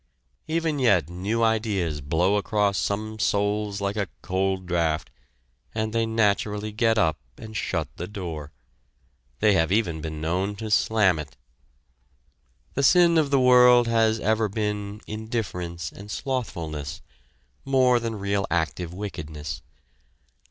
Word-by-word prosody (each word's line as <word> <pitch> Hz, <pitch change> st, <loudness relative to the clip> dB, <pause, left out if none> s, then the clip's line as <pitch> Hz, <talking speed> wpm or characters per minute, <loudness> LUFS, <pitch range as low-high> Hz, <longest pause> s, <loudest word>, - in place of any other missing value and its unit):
Even 160 Hz, -2 st, 0 dB
yet 95 Hz, -, +3 dB
new 100 Hz, +6 st, -1 dB
ideas 105 Hz, -9 st, 0 dB
blow 85 Hz, +8 st, +1 dB
across 100 Hz, -1 st, +1 dB
some 110 Hz, +2 st, -2 dB
souls 105 Hz, 0 st, 0 dB
like 100 Hz, 0 st, -1 dB
a 100 Hz, -4 st, -2 dB
cold 95 Hz, 0 st, -1 dB
draught, 85 Hz, -3 st, 0 dB, 0.6 s
and 110 Hz, 0 st, -1 dB
they 115 Hz, -1 st, +1 dB
naturally 105 Hz, -1 st, 0 dB
get 115 Hz, +1 st, +2 dB
up 80 Hz, -7 st, +2 dB, 0.2 s
and 110 Hz, 0 st, -10 dB
shut -, -, -1 dB
the 90 Hz, -, -5 dB
door! 85 Hz, -8 st, -6 dB, 0.9 s
They 105 Hz, -1 st, +5 dB
have 80 Hz, -2 st, +2 dB
even 90 Hz, -7 st, +1 dB
been 80 Hz, 0 st, -5 dB
known 90 Hz, +6 st, -1 dB
to 110 Hz, +1 st, -6 dB
slam 105 Hz, -6 st, +3 dB
it! 70 Hz, -5 st, -8 dB, 1.4 s
The 140 Hz, -, 0 dB
sin 170 Hz, +4 st, +5 dB
of 150 Hz, -3 st, +1 dB
the 140 Hz, -1 st, +3 dB
world 125 Hz, -1 st, +6 dB
has 115 Hz, -1 st, +2 dB
ever 110 Hz, 0 st, +1 dB
been 105 Hz, 0 st, -3 dB
indifference 90 Hz, -7 st, -4 dB
and 100 Hz, +1 st, -11 dB
slothfulness, 85 Hz, -, -4 dB, 0.6 s
more 130 Hz, -2 st, +3 dB
than 115 Hz, -1 st, -3 dB
real 100 Hz, -1 st, -1 dB
active 85 Hz, +1 st, -2 dB
wickedness. 75 Hz, -7 st, -6 dB
105 Hz, 130 wpm, -25 LUFS, 90-110 Hz, 1.4 s, world